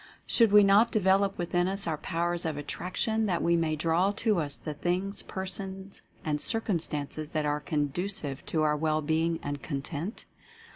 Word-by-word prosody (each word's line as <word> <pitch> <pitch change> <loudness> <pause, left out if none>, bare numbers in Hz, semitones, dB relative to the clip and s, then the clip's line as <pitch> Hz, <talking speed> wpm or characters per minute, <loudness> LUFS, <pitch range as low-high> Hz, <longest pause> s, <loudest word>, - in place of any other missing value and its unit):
Should 230 -4 +4
we 210 0 +8
not 205 +4 +5
develop 195 -2 +2
within 175 0 0
us 195 +1 -1
our 155 -3 -2
Powers 175 0 0
of 160 -3 -2
Attraction, 215 +8 -1
that 180 -3 0
we 170 0 +3
may 165 -2 +1
draw 165 +5 +2
to 215 -2 +1
us 145 -3 +1
the 155 - -5
things, 180 +6 -2
persons 190 0 -5 0.2
and 150 -1 -1
circumstances 155 -8 -1
that 155 -2 -1
are 150 0 0
conducive 150 0 -2
to 160 -2 +1
our 150 -1 +3
well 155 0 0
being 160 +2 +1
and 145 -1 -4
content? 155 - -4
170 Hz, 165 wpm, -29 LUFS, 155-195 Hz, 0.2 s, we